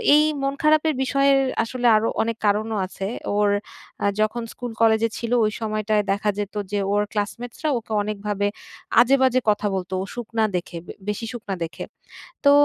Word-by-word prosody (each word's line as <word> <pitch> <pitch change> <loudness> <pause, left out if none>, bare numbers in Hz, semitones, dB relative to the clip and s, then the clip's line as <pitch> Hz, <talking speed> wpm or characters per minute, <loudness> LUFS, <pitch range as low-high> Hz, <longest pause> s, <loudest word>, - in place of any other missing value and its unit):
এই 300 - +6 0.2
মন 275 0 +1
খারাপের 310 0 +4
বিষয়ে 275 +1 +3 0.3
আসলে 245 +1 -1
আরো 215 +1 +2
অনেক 230 0 -1
কারণও 215 +1 +1
আছে। 190 +1 -6 0.3
ওর 205 -1 +3 0.7
যখন 215 +2 +1
স্কুল-কলেজে 225 -1 +1
ছিল 235 0 -4
ওই 215 - +1
সময়টায় 215 -1 0
দেখা 200 +1 0
যেত 205 0 -3 0.2
যে 205 - 0
ওর 205 - +3
ক্লাসমেটসরা 235 +7 -3
ওকে 225 -1 -8
অনেকভাবে 205 -1 -2 0.5
আজেবাজে 260 0 +4
কথা 205 0 +1
বলতো 185 0 -4
ও - - -2
শুকনা 230 -2 -1
দেখে, 175 -1 -3 0.3
বেশি 210 +2 -2
শুকনা 210 -5 -4
দেখে। 165 - -6 0.6
তো 280 - +7
220 Hz, 150 wpm, -23 LUFS, 205-240 Hz, 0.7 s, তো